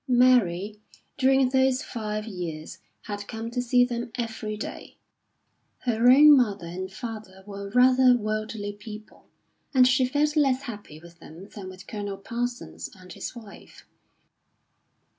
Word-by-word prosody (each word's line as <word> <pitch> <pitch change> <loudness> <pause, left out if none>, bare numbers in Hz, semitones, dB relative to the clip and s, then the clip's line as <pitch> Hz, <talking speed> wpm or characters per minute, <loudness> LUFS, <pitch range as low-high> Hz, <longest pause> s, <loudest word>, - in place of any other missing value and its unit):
Mary, 215 -6 +3 0.4
during 265 -1 +4
those 265 +1 +2
five 215 -6 -4
years, 170 -5 -6 0.2
had 205 -1 -6
come 225 0 -6
to 245 +1 -1
see 245 0 +3
them 240 0 -4
every 220 -3 -4
day; 215 - -8 0.8
her 240 0 +3
own 295 +3 +9
mother 210 -8 +1
and 185 +3 -6
father 210 -3 -8
were 200 -1 -7
rather 255 0 +6
worldly 215 -1 -3
people, 210 +1 -12 0.5
and 255 -1 +7
she 260 +1 +3
felt 295 +4 +1
less 275 -3 +2
happy 205 - -9
with 170 +1 -16
them 175 +6 -12
than 195 -3 -9
with 185 0 -12
Colonel 205 -2 -5
Parsons 240 +4 -5
and 185 -1 -12
his - - -7
wife. 220 -4 -13
220 Hz, 140 wpm, -26 LUFS, 200-250 Hz, 0.8 s, own